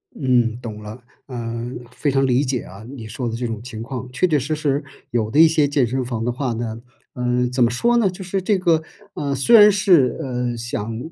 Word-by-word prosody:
嗯， 120 -4 +1
懂 110 -3 -7
了， 110 +4 -9 0.2
嗯， 120 0 -5
非 145 +3 -2
常 135 0 +2
理 130 +2 +2
解 130 -2 -1
啊 100 +3 -12
你 120 -2 -9
说 120 +2 -4
的 115 - -4
这 120 +1 -3
种 115 -2 -4
情 115 -2 -7
况。 125 0 -6
确 155 +8 +1
确 150 -3 +2
实 150 +4 -2
实， 145 -1 -1 0.3
有 115 -3 0
的 145 +8 +1
一 165 - +9
些 155 -2 +2
健 140 -2 +2
身 130 +2 -2
房 115 -2 -3
的 120 - 0
话 125 -1 -2
呢， 115 0 -4 0.3
嗯， 125 0 0
怎 125 0 +2
么 115 - +4
说 235 - +2
呢？ 215 -5 +3
就 185 +1 -8
是 190 +1 -2
这 200 +2 +1
个， 170 -4 +2 0.3
呃， 140 -1 -2
虽 185 - +4
然 210 -1 +9
是， 185 -10 +3
呃， 125 -4 -3
想 115 -1 -4
125 Hz, 245 characters per minute, -21 LUFS, 115-150 Hz, 0.3 s, 一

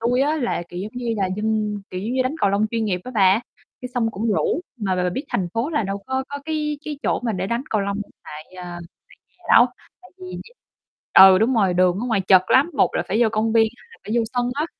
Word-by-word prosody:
tui 245 +3 +1
á 300 +3 +1
là, 245 - -1
kiểu, 175 - -7
giống 210 - -6
như 240 -2 -2
là, 195 -2 0
dân, 210 -1 -1
kiểu, 185 - -5
giống 220 +5 -3
như, 260 - +2
đánh 255 +4 -2
cầu 200 - +3
lông 205 +2 +1
chuyên 225 -1 -1
nghiệp 180 -4 -1
á 255 - -7
bà, 195 +1 +4 0.4
cái 250 - -6
xong 225 -2 +1
cũng 220 +3 -4
rủ. 315 - 0 0.2
Mà 200 -5 -1
b 185 - -3
bà 180 0 0
biết 265 - -4
thành 180 -2 -1
phố 240 +8 -1
là 300 -7 0
đâu 195 0 -3
có 265 0 -2
có 285 - -5
cái 300 -1 -2
cái 295 -2 -5
chỗ - - 0
mà 235 -3 -2
để 185 0 -2
đánh 235 +4 -2
cầu 215 - +1
lông 200 0 -2
hiện 205 - -6
tại, 150 +1 -9
à, 175 -1 -7 0.5
tại - - -40
nhà - - -29
đâu. - - +8 0.4
Tại 365 - -17
vì 370 - -9 0.9
ừ, 190 -1 +9
đúng 235 +5 +2
rồi, 195 -5 +2
đường 180 +1 +2
ở 240 - -3
ngoài 220 -5 +1
chật 185 0 +5
lắm, 275 +6 +5
một - - +3
là - - 0
phải 220 +5 0
vô 220 - +2
công 220 0 0
viên, 225 -1 +5
hai - - -21
là 460 - -16
phải - - -7
vô 230 - +2
sân 245 -1 0
á. 295 +3 -1
220 Hz, 275 wpm, -22 LUFS, 195-255 Hz, 0.9 s, ừ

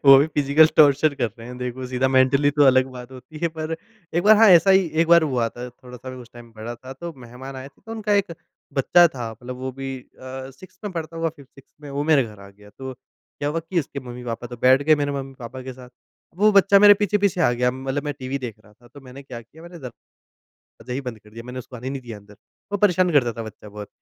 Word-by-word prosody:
वो 135 -1 +10
भी 145 - +3
physical 150 0 +4
torture 145 0 +5
कर 120 -4 -1
रहे 115 - -10
हैं, 125 0 -8
देखो 125 +1 -5
सीधा। 130 +1 0
मेंटली 135 +2 +3
तो 145 0 +3
अलग 130 -1 +5
बात 125 0 -10
होती 130 +4 -12
है, 170 - +2
पर 160 0 -5 0.4
एक 175 - +2
बार, 215 +2 +7
हाँ, 225 0 +7
ऐसा 185 +2 +7
ही 190 -1 +5 0.2
एक 165 - -1
बार 170 0 +7
हुआ 125 -6 0
था। 125 +1 -8
थोड़ा-सा 125 +1 -11
मैं 130 - -9
उस 120 -2 -12
टाइम 120 -1 -13
बड़ा 115 +2 -6
था, 130 +2 -11
तो 170 +5 -8
मेहमान 130 +2 -10
आए 130 +1 -8
थे, - - -30
तो 225 - -7
उनका 215 -2 -2
एक 200 -4 +1 0.4
बच्चा 170 +6 +5
था। 120 -3 -5
मतलब 125 +3 -9
वो 130 +1 -5
भी 135 0 -6
अ, 130 +1 -10
6th 185 +7 -17
में 200 - -4
पढ़ता 165 -1 -6
होगा, 165 0 0
5th-6th 140 -3 -17
में, 145 -2 -10
वो 140 +1 -2
मेरे 140 -4 +5
घर 105 -3 -12
आ 100 - -12
गया। 105 +1 -18
तो 130 0 -6
क्या 145 +3 -9
हुआ 165 +2 -2
कि 170 +2 -3
उसके 140 -1 -7
मम्मी-पापा 120 -1 -6
तो 120 0 -9
बैठ 130 +2 +5
गए, 155 +1 +5
मेरे 145 -1 -1
मम्मी-पापा 130 -2 -7
के 130 - -7
साथ। 125 0 -13 0.5
वो 210 +3 +4
बच्चा 200 0 +6
मेरे 205 0 +8
पीछे-पीछे 200 -2 0
आ 160 - +4
गया। 125 +1 +1
मतलब 135 +2 -4
मैं 145 - -2
टीवी 130 +1 -4
देख 120 -5 -6
रहा 105 - -20
था, 120 +3 -22
तो 145 +3 -14
मैंने 135 +1 -12
क्या 125 -3 -9
किया, 155 +8 -17
मैंने 175 0 -11
दरवाज़ा 125 -2 -14
ही 135 - -2
बंद 125 -5 -7
कर 105 - -20
दिया। 115 +2 -10
मैंने 125 +1 -7
उसको 125 0 -9
आने 130 +3 -6
नहीं 135 - -5
दिया 115 -4 -8
अंदर। 100 0 -18 0.4
वो 205 - 0
परेशान 185 -3 +3
करता 120 -5 +3
था 115 - -6
बच्चा 110 -1 -11
बहुत, 105 0 -9
130 Hz, 255 wpm, -22 LUFS, 125-155 Hz, 0.5 s, वो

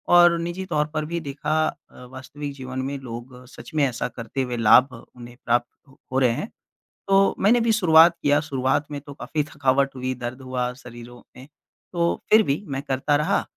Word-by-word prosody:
और 175 -1 +6
निजी 175 +3 -4
तौर 150 -4 0
पर 155 0 -2
भी 170 +2 -3
देखा 150 0 -3
अ, 125 - -10
वास्तविक 140 +2 -8
जीवन 130 -1 -7
में, 140 +2 -4
लोग 125 0 -9
सच - - -12
में 150 - +3
ऐसा 125 -2 -3
करते 125 +2 -5
हुए 125 -2 -3
लाभ 125 +4 +5 0.2
उन्हें 120 0 -12
प्राप्त 120 +3 -2
हो 130 - +1
रहे 125 -3 +3
हैं। 200 - -4 0.6
तो 195 0 +4
मैंने 230 +5 +4
भी 230 0 +2
शुरुआत 170 -5 +6
किया, 145 0 +3
शुरुआत 140 -1 -1
में 145 -1 -5
तो 145 0 -11
काफ़ी 150 +2 -3
थकावट 140 -2 0
हुई, 130 0 -3
दर्द 125 +1 -7
हुआ 125 -1 -3
शरीरों 120 0 -12 0.2
में। 130 +1 -12 0.5
तो 170 -1 +1 0.2
फ़िर 220 +1 +7
भी 140 +7 -1
मैं 135 -1 -4
करता 140 +1 -1
रहा 150 +7 0
140 Hz, 190 wpm, -23 LUFS, 125-155 Hz, 0.6 s, फ़िर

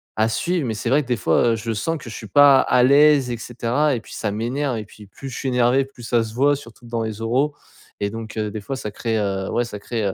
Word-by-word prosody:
à 110 +1 +2
suivre 160 +5 -1
mais 110 - -2
c'est 115 - -3
vrai 145 +2 +4
que 130 - -10
des 125 - +1
fois, 115 +5 +2
heu, - - +1
je 115 +1 -3
sens 165 +10 -2
que 135 - -12
je - - -7
suis 110 - -8
pas 140 +3 +7
à 125 - +3
l'aise, 140 -1 +5
et 120 - -3
cetera, 125 +5 0
et 120 - -3
puis - - -13
ça 105 - -2
m'énerve 120 +4 -2
et 105 - -5
puis 105 0 -15
plus 135 +7 -9
je - - -7
suis 135 - -3
énervé 125 +2 +3
plus 130 -3 -15
ça 120 0 +1
se 110 0 -8
voit 140 +2 +3
surtout 120 -3 -13
dans 115 -1 -3
les 110 -1 -4
oraux 135 +6 +1 0.5
et 100 - 0
donc, 115 -1 -7
heu, 105 -1 -2
des 110 -1 -6
fois 135 +6 -4
ça 105 -5 -5
crée, 115 +1 -2
heu, 95 -2 -2
ouais 120 - +1
ça 105 -3 -7
crée, 115 0 -3
heu, 95 - 0
120 Hz, 290 wpm, -21 LUFS, 110-135 Hz, 0.5 s, pas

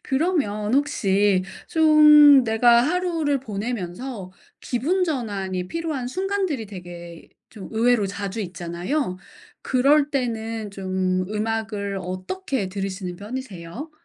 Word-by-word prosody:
그러면 265 - 0
혹시 205 -9 +2 0.2
좀 300 -3 +7
내가 235 +1 +4
하루를 325 -3 0
보내면서 210 -2 -5 0.3
기분 330 +10 0
전환이 195 - -3
필요한 315 -5 -3
순간들이 375 - -2
되게 175 -3 -10 0.2
좀 205 -4 -10
의외로 225 -2 +2
자주 200 +2 -5
있잖아요. 180 - -3 0.4
그럴 280 +3 +3
때는 225 -5 -3
좀 185 -1 -1
음악을 210 -2 -2
어떻게 185 - -4
들으시는 190 -2 -5
편이세요? 215 - -7
225 Hz, 250 characters per minute, -23 LUFS, 190-285 Hz, 0.4 s, 좀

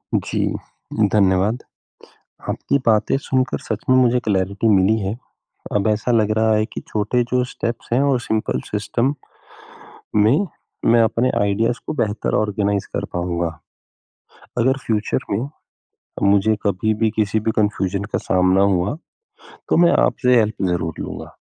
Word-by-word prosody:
जी, - - -1 0.7
धन्यवाद। 100 +3 +2 0.9
आपकी 140 - 0
बातें 110 +3 +3
सुनकर 130 -1 0
सच - - -4
में 130 - +6
मुझे 125 -1 +3
क्लैरिटी 100 +2 0
मिली 95 +4 +3
है। 100 0 -2 0.6
अब 105 +1 +1
ऐसा 110 +3 -1
लग 110 -2 +2
रहा 110 0 +3
है 110 0 +1
कि - - -7
छोटे 110 +4 0
जो 125 - +3
स्टेप्स 115 +1 -4
हैं 120 - +3
वो 140 -2 +2
सिंपल 110 0 -1
सिस्टम 120 +6 -1 1.0
में, 120 - +4 0.4
मैं 115 0 +5
अपने 115 +3 +1
आइडियाज़ 110 +5 0
को - - -2
बेहतर 105 0 -3
ऑर्गनाइज़ 100 -1 -1
कर - - -1
पाऊँगा। 85 -2 -2 1.0
अगर 130 +3 +2
फ्यूचर 110 -2 0
में, 115 +8 -1 0.7
मुझे 100 +2 +3
कभी 105 +2 +1
भी 110 0 +1
किसी 110 0 +1
भी 110 - 0
कन्फ्यूजन 100 -2 0
का 105 - -2
सामना 95 +1 +4
हुआ, 100 - +1 0.7
तो - - +2
मैं 170 0 +5
आपसे 125 -1 +2
हेल्प 110 -2 -2
ज़रूर 80 -2 -2
लूँगा। - - -7
110 Hz, 140 wpm, -20 LUFS, 100-120 Hz, 1.0 s, में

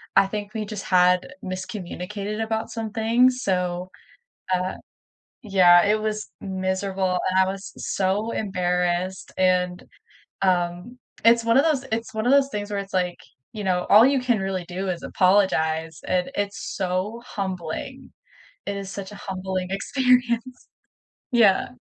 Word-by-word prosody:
I - - +6
think 205 +1 -5
we 220 - -2
just 205 -1 -6
had 180 0 +3
miscommunicated 190 +2 -5
about 220 0 -3
some 225 -2 -4
things, 240 +4 +3
so, 180 -1 -1 0.6
uh 185 +1 -1 0.7
Yeah, 180 -4 +6
it 215 +1 +2
was 215 0 -3
miserable, 190 -1 -1
and 185 - +1
I 190 - +5
was 195 0 -7
so 200 +4 -1
embarrassed, 180 -2 -1
and, 180 -1 +2 0.6
um, 180 +5 0 0.3
it's 230 0 +5
one 230 +2 +4
of 280 - +5
those 295 -5 +1
it's 230 0 -2
one 220 +2 -2
of 255 - +4
those 275 -1 +5
things 205 -3 -4
where 205 - -2
it's, 195 0 -10
like, 180 -1 0 0.4
you 210 -2 -5
know, 180 -1 0
all 210 +3 +9
you 275 -1 +2
can 245 -3 +1
really 190 -2 -2
do 190 +2 -4
is 180 -2 -3
apologize, 165 -5 +1
and 180 -1 0
it's 200 0 -2 0.2
so, 190 +4 -2
humbling. 185 -5 -5 0.5
It 200 0 -3
is 195 -1 -6
such 195 0 -7
a 210 - -9
humbling 185 -1 -4
experience. 250 +2 +1 0.7
Yeah. 220 -6 +4
195 Hz, 150 wpm, -24 LUFS, 185-220 Hz, 0.7 s, all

